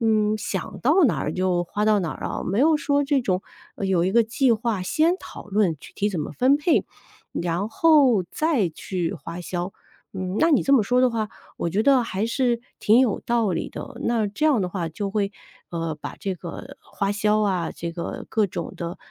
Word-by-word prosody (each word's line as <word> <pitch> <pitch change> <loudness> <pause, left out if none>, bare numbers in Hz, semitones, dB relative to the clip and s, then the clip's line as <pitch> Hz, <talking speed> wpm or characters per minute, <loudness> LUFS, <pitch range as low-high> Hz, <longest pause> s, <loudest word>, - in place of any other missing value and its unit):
嗯， 215 -1 +2
想 190 -3 -4
到 310 +7 +4
哪 240 - +2
儿 150 - -2
就 180 -1 0
花 205 +4 -2
到 215 -1 +4
哪 170 -4 -2
儿 - - -6
啊， - - -3
没 195 +3 -1
有 310 +2 +5
说 285 -1 +1
这 280 -1 +2
种 185 -3 0 0.3
有 190 -3 +1
一 190 - 0
个 235 - +5
计 245 +3 +2
划 220 -3 -1
先 320 - +2
讨 - - -10
论 200 -5 +1
具 - - -13
体 205 - 0
怎 175 - -2
么 150 - -4
分 260 - +4
配， 300 +3 +2 0.5
然 175 +4 -1
后， 275 - +5
再 295 - +1
去 175 +1 -3
花 165 +3 -7
销。 175 +2 -4 0.4
嗯， 185 +1 -3
那 325 +2 +4
你 285 - +4
这 275 - +2
么 255 - +6
说 250 +4 +2
的 255 -1 +4
话， 220 -2 -2 0.3
我 170 - -1
觉 200 +5 +1
得 270 0 +5
还 200 0 -2
是 240 -1 +1 0.2
挺 220 +4 +5
有 245 -6 +2
道 235 -4 +2
理 175 - -2
的， - - -8
那 230 -3 +1
这 210 +10 -3
样 275 -9 +3
的 180 - -1
话 175 -3 -3
就 195 +5 -4
会， 200 -1 -1 0.4
呃， 165 -2 -3
把 - - -6
这 195 -3 -2
个 170 0 -8
花 200 -1 -3
销 210 +1 +2
啊， 185 -5 0
这 170 0 -5
个 170 0 -5
各 215 -2 +2
种 170 -3 -5
的 170 +2 -5
210 Hz, 230 characters per minute, -24 LUFS, 180-245 Hz, 0.5 s, 么